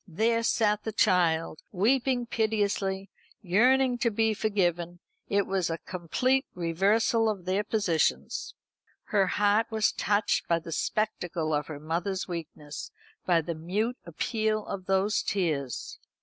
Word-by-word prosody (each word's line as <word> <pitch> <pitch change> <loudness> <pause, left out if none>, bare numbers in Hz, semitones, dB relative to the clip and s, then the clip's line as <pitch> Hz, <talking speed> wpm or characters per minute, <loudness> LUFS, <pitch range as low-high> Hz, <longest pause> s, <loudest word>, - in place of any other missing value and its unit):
There 225 +7 +1
sat 210 -2 +2
the 220 - -3
child, 165 -6 +2
weeping 245 +5 +2
piteously, 205 -4 -1 0.3
yearning 250 +6 +3
to 235 - +2
be 220 0 +1
forgiven. 175 -5 0 0.3
It 200 -1 +1
was 190 -3 0
a 165 - -2
complete 250 +12 0
reversal 200 +7 +2
of 195 -5 -4
their 190 +3 +1
positions. 200 -7 0 0.5
Her 195 -3 +2
heart 205 +4 +2
was 220 -1 +2
touched 205 0 0
by 170 - +3
the 165 0 -8
spectacle 175 -3 -1
of 150 0 0
her 155 -2 -7
mother's 175 +5 -2
weakness, 155 -4 -7 0.4
by 170 -2 +4
the 170 +2 -4
mute 205 +10 -2
appeal 215 +5 -1
of 190 -2 -6
those 195 +2 +2
tears. 155 - -2
195 Hz, 135 wpm, -28 LUFS, 170-220 Hz, 0.5 s, by